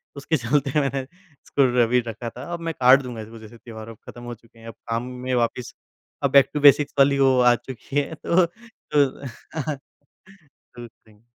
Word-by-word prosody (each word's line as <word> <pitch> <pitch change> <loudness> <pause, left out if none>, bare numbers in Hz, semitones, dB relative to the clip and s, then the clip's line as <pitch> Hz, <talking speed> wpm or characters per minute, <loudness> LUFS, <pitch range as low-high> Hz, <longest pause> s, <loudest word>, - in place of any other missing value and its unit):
उसके 145 +3 -1
चलते 140 +4 0
मैंने 135 -1 -1
इसको 145 -2 -3 0.2
र 115 - +1
भी 125 +1 +3
रखा 115 +1 -5
था, 125 +3 -10
अब 170 - -4
मैं 165 -1 -4
काट 130 +2 +6
दूँगा 120 -4 -7
इसको 110 +1 -11
जैसे 110 +2 -13
त्यौहार 110 -1 -10
अब 115 - -11
ख़त्म 120 - -11
हो 120 0 -6
चुके 115 +1 -24
हैं, 115 - -13
अब 115 - -8 0.2
काम 115 +1 -1 0.2
में 130 - -1
वापस 120 0 -2 0.5
अब - - +1
बैक 140 -1 +6
टू 150 - -1
बेसिक्स 145 0 +5
वाली 140 0 +4
वो 130 -1 +4
आ 120 -1 +5
चुकी 130 +3 -10
है 150 +3 -4
तो 175 +1 +4
तो 170 - -2 1.6
टू 120 0 -9
थिंक। 110 -2 -26
130 Hz, 195 wpm, -23 LUFS, 115-140 Hz, 1.6 s, काट